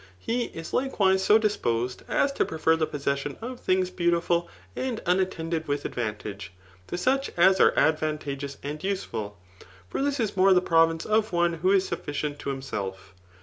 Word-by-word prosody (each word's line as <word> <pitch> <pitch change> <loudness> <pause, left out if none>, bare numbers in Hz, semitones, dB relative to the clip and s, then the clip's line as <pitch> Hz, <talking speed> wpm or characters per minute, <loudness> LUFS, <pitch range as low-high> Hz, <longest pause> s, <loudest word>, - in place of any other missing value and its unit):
He 235 - -1
is 165 0 -8
likewise 195 -8 +2
so 210 - +6
dis 215 -1 +1
^posed, 120 +2 -1
as 280 - +2
to - - +1
prefer 160 0 +1
the 160 -1 0
possesion 140 0 -2
of 245 +2 -6
things 185 0 +1
beautiful 170 0 +1 0.3
and 255 -4 -2
tmattended 170 -3 0
vith 145 0 -2
adrantage, 105 -5 -4 0.4
to - - -4
such 270 +9 +1
as 190 +2 +5
are - - +6
advantageous 145 -3 0
and 150 +1 -5
useful; 110 - -3 0.5
for 100 - -3
this 280 0 0
is 220 -4 -1
more 190 0 +5
the 180 - +5
province 165 -2 +2
of 215 0 +1
one 175 -1 +2
who 175 +4 +1
is 195 -1 +3
sufficient 145 0 -4
to - - -4
himself. 100 -8 -5
170 Hz, 170 wpm, -26 LUFS, 140-190 Hz, 0.5 s, so